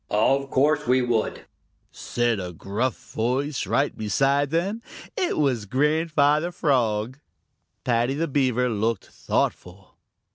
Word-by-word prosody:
"Of 135 +6 +2
course 150 +3 +2
we 125 +1 +3
would," 120 -3 -1 0.5
said 120 -3 -1
a 90 -1 -5
gruff 105 +9 -2 0.2
voice 130 +5 -1
right 140 +1 +1
beside 135 +6 +1
them. 190 +8 -1 0.3
It 380 -6 -1
was 125 -8 0
Grandfather 150 - +2
Frog. 125 -5 0 0.6
Paddy 120 +2 +1
the 165 +3 -1
Beaver 130 -3 +1
looked 110 -2 -1
thoughtful. 90 +1 -3
130 Hz, 115 wpm, -24 LUFS, 115-145 Hz, 0.6 s, we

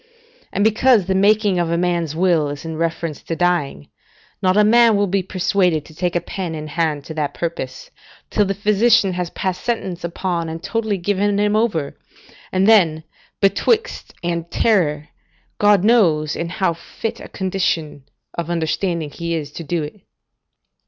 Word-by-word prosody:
And 200 - 0
because 220 -1 +4
the 190 - 0
making 205 -1 +3
a 170 -1 0
man's 170 -3 -1
will 170 -4 +2
is 145 +2 -7
in 160 0 -4
reference 165 -1 -3
to 165 - -4
dying, 170 - 0 0.5
not 185 +1 +2
a 210 - +6
man 230 +1 +5
will 205 0 +2
be 195 0 0
persuaded 180 -4 0
to 160 - -14
take 175 +2 -2
a - - +3
pen 175 -1 -5
in 155 -1 -6
hand 150 -2 -1
to 160 - -7
that 150 -2 -3
purpose, 165 -6 -5 0.4
till 210 - +2
the 195 0 -2
physician 210 0 +3
has 180 -1 -3
passed 185 -1 -3
sentence 190 -7 -3
upon 170 -1 -2
and 165 +1 -7
totally 220 0 -1
given 200 +2 0
him 210 0 +2
over, 205 -10 0 0.6
and 190 +1 +2
then 170 -8 +4 0.4
betwixt 430 - +1
and 170 -1 -2
terror, 155 -9 +1 0.5
God 205 -2 +4
knows 165 -10 +3
in 170 - -3
how 185 -2 0
fit 195 +6 -6
a - - -9
condition 170 -7 -2 0.3
of 170 -1 -4
understanding 170 -1 -1
he 170 +2 -3
is 150 -3 -4
to 165 - -7
do 165 +1 -2
it. 155 +7 -9
175 Hz, 165 wpm, -20 LUFS, 165-205 Hz, 0.6 s, a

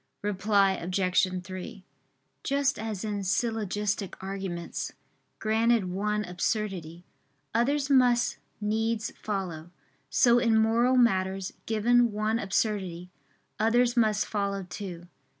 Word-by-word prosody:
Reply 200 0 +2
Obj. 185 0 0
3: 185 +1 -8 0.6
Just 280 0 +1
as 220 -2 -4
in 205 -2 -2
syllogistic 210 -1 -1
arguments, 190 -3 -5 0.4
granted 220 -3 +2
one 210 +3 -1
absurdity, 180 -2 -3 0.5
others 275 +5 +1
must 245 -2 +3 0.2
needs 220 +1 -1
follow; 180 -6 -4 0.4
so 240 -1 +5
in 230 -2 +3
moral 230 +3 +3
matters, 190 -5 +2
given 235 +2 +3
one 215 +2 0
absurdity, 190 -4 -1 0.5
others 240 +2 +3
must 215 -3 +2
follow 200 -2 -2
too. 175 -3 -7
210 Hz, 100 wpm, -28 LUFS, 190-230 Hz, 0.6 s, so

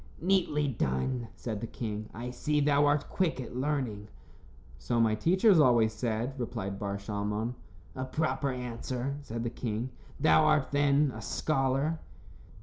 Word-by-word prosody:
"Neatly 170 -5 +2
done," 115 - -1
said 110 -4 -4
the 115 - -3
king. 110 -2 -5
"I 120 +3 -6
see 150 +4 0
thou 145 0 +4
art 145 0 +2
quick 180 -7 0
at 125 -1 -6
learning." 130 -7 -2 0.7
"So 120 - 0
my 110 -1 +4
teachers 180 - +4
always 120 -6 +5
said," 115 +3 -2
replied 100 -5 -4
Bar 100 -1 -2
Shalmon. 105 +3 -2 0.4
"A 130 - -3
proper 140 0 -1
answer," 125 +1 -3
said 115 -4 -5
the 120 - -2
king. 120 +1 -3 0.3
"Thou 155 +1 +5
art, 155 -2 +3
then, 145 0 +3
a 110 - -7
scholar." 135 +7 0
125 Hz, 145 wpm, -30 LUFS, 110-145 Hz, 0.7 s, always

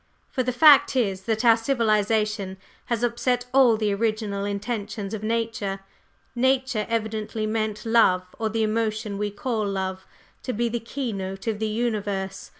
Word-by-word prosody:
For 260 - 0
the 250 0 0
fact 285 +1 +6
is 195 -6 0
that 220 +1 0
our 230 -1 +8
civilization 215 -4 0 0.3
has 235 -1 -2
upset 245 +1 0
all 255 -4 +6
the 210 -2 0
original 215 -2 -1
intentions 205 0 -4
of 215 - -4
nature. 220 -3 -2 0.5
Nature 260 -3 +1
evidently 220 -1 -2
meant 215 -1 -2
Love, 225 -5 +4 0.2
or 220 -1 0
the 220 0 0
emotion 215 -1 -1
we 210 0 -1
call 215 +2 -2
Love, 190 -1 -3 0.3
to 255 - -3
be 235 +2 0
the 235 +1 -2
keynote 200 -6 -5
of 220 -3 -1
the 220 - 0
universe. 205 -4 -2
220 Hz, 150 wpm, -25 LUFS, 205-235 Hz, 0.5 s, our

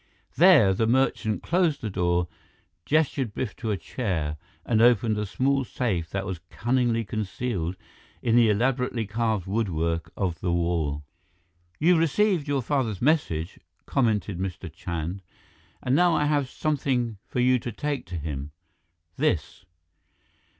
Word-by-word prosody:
There, 150 - +7
the 110 +4 +1
merchant 115 -3 +1
closed 170 -4 +1
the 110 - -3
door, 90 -1 +1 0.6
gestured 140 -7 +1
Biff 120 -6 -3
to 110 - -4
a 105 - 0
chair, 85 - -3 0.3
and 110 -2 +2
opened 115 -2 +4
a 105 - -2
small 135 +6 +1
safe 95 -10 -2
that 95 +1 -3
was 95 -3 -4
cunningly 120 -2 0
concealed 100 -4 -3 0.5
in 115 -1 +2
the 120 -2 +6
elaborately 125 +1 +1
carved 110 -2 -1
woodwork 85 -6 -1
of 90 -4 -1
the 90 - -1
wall. 85 -4 0 0.7
"You 170 +3 +4
received 165 0 +2
your 140 -3 0
father's 115 -7 -1
message," 120 - 0 0.3
commented 105 -7 0
Mr. 90 -3 -5
Chand, 85 +2 -4 0.6
"and 130 - +2
now 175 +1 +4
I 150 - +2
have 145 -3 +1
something 130 -8 -1
for - - -3
you 125 0 +4
to 120 - -5
take 145 +2 -3
to 90 0 -5
him. 75 -2 -5 0.6
This." 85 +2 -1
110 Hz, 140 wpm, -26 LUFS, 90-130 Hz, 0.7 s, There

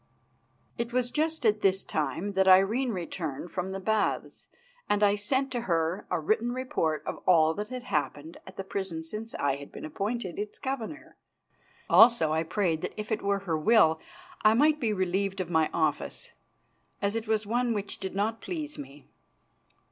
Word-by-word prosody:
It 235 0 -2
was 245 0 0
just 315 -3 0
at 210 -1 +3
this 190 0 +2
time 155 +7 -2
that 190 0 +2
Irene 195 +8 +5
returned 170 -4 -4
from 185 +1 -3
the 195 - -4
Baths, 215 +2 -1 0.4
and 205 0 +2
I 205 0 +5
sent 260 +6 0
to 245 -2 -2
her 170 -3 -1
a 180 - 0
written 220 +9 0
report 205 -12 -1
of - - -4
all 160 -3 +5
that 210 +4 -4
had 255 -1 -6
happened 150 - -3
at 190 - -12
the 195 - -3
prison 190 -4 -4
since 215 +7 -6
I 140 -1 0
had 140 0 -11
been - - -8
appointed 195 +4 -3
its 205 0 -5
governor. 275 +5 -5 0.7
Also 225 -9 +6
I 160 +1 +1
prayed 165 -1 0
that - - -5
if 210 +1 -5
it 220 - 0
were 200 0 0
her 165 -3 0
will 160 -4 +5 0.4
I 215 +1 +6
might 300 +4 +4
be 230 -6 0
relieved 195 0 -1
of 180 -2 -3
my 160 -2 +3
office, 155 -3 -1 0.7
as 200 0 0
it 225 -1 -3
was 220 -1 +1
one 240 +3 0
which 205 -3 -3
did 190 0 -5
not 220 +3 -1
please 310 -4 -5
me. 140 +1 -11
200 Hz, 180 wpm, -28 LUFS, 165-230 Hz, 0.7 s, Also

